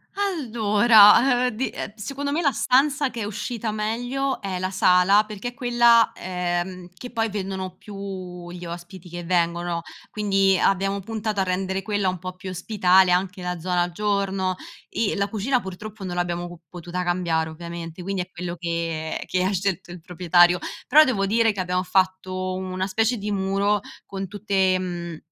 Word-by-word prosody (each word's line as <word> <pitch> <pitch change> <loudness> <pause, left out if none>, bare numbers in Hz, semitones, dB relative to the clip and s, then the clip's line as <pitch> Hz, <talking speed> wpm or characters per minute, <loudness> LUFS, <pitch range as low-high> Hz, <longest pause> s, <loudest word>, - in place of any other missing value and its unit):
Allora, 240 - +5
uhm, - - +1
di 245 +4 -2
ehm, 205 - -6
secondo 275 +6 -4
me 310 +4 0
la 285 -4 +3
stanza 275 +3 +2
che 230 - -5
è - - -1
uscita 220 +2 -4
meglio 245 +6 -2
è 195 -2 -3
la 185 +1 -2
sala, 185 +2 +5
perché 215 +2 -5
è - - -14
quella, 240 -2 +4
ehm, 180 0 -3
che 245 +6 -9
poi 225 -2 0
vendono 190 -2 -4
più 185 -3 -8
gli 175 0 -8
ospiti 175 +1 -9
che 175 +1 -6
vengono. 170 0 0 0.3
Quindi, 195 -2 +2
abbiamo 195 +2 +1
puntato 215 0 -3
a - - +3
rendere 190 +1 -1
quella 205 -3 0
un 185 - -3
po' 185 +2 -6
più 185 +1 -8
ospitale, 185 0 +3
anche 185 +2 0
la 180 -1 -3
zona 175 0 0
giorno, 195 -1 -1 0.3
e 225 - -1
la 200 0 0
cucina 225 +5 0
purtroppo 205 +2 -8
non 180 -2 -4
l'abbiamo 175 0 -2
co 175 -1 -12
potuta 175 +2 -5
cambiare 170 -3 0
ovviamente, 170 +1 -7
quindi 195 +1 -2
è 180 - -17
quello 175 -1 -5
che 165 -2 -3
che 185 0 0
ha 190 - +1
scelto 190 -2 -2
il 175 -1 -9
proprietario. 175 +1 +4 0.3
Però, 300 +4 +8
devo 220 -9 +1
dire 225 +2 +3
che 205 - -7
abbiamo 180 0 0
fatto 185 0 0
una 185 0 -3
specie 225 +5 +1
di 210 0 -4
muro 200 +1 +1 0.2
con 195 0 -5
tutte, 190 -1 +1
mhmm, 175 -2 -5
190 Hz, 175 wpm, -24 LUFS, 180-215 Hz, 0.3 s, Però